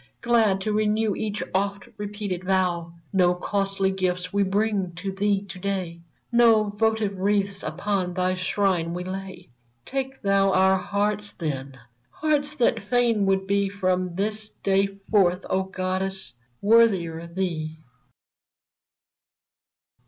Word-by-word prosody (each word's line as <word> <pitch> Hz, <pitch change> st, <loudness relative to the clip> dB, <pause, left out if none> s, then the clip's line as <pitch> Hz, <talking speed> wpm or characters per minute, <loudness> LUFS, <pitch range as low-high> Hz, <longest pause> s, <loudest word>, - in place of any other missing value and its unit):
Glad 225 Hz, -5 st, +3 dB
to 215 Hz, +2 st, -1 dB
renew 215 Hz, 0 st, +1 dB
each 210 Hz, -3 st, -3 dB
oft 200 Hz, +1 st, -1 dB
repeated 205 Hz, -3 st, -4 dB
vow! 180 Hz, -3 st, 0 dB, 0.2 s
No 180 Hz, -2 st, +4 dB
costly 195 Hz, +1 st, 0 dB
gifts 180 Hz, -1 st, -2 dB
we 200 Hz, -, +2 dB
bring 200 Hz, -2 st, 0 dB
to 195 Hz, +3 st, -4 dB
thee 200 Hz, 0 st, 0 dB
to 190 Hz, -2 st, -9 dB
day; 180 Hz, -3 st, -3 dB, 0.3 s
No 225 Hz, -3 st, +5 dB
votive 215 Hz, -2 st, 0 dB
wreaths 200 Hz, 0 st, +1 dB
upon 180 Hz, +2 st, -2 dB
thy 185 Hz, 0 st, +1 dB
shrine 185 Hz, -2 st, 0 dB
we 180 Hz, -, -3 dB
lay; 190 Hz, -3 st, -7 dB, 0.4 s
Take 270 Hz, 0 st, -4 dB
thou 195 Hz, -1 st, +3 dB
our 190 Hz, 0 st, +4 dB
hearts, 205 Hz, +2 st, -1 dB
then! 135 Hz, -5 st, -4 dB, 0.2 s
— 120 Hz, +1 st, -43 dB
hearts 300 Hz, -1 st, +1 dB
that 230 Hz, -5 st, +1 dB
fain 235 Hz, -5 st, +3 dB
would 190 Hz, 0 st, +2 dB
be 200 Hz, 0 st, +1 dB
From 185 Hz, -2 st, -1 dB
this 215 Hz, +2 st, -2 dB
day 195 Hz, 0 st, +3 dB, 0.2 s
forth, 185 Hz, -3 st, +3 dB
O 190 Hz, -, +2 dB
goddess, 190 Hz, -4 st, -3 dB, 0.3 s
worthier 190 Hz, -7 st, +3 dB
thee 170 Hz, -3 st, -3 dB
195 Hz, 130 wpm, -25 LUFS, 185-210 Hz, 0.4 s, No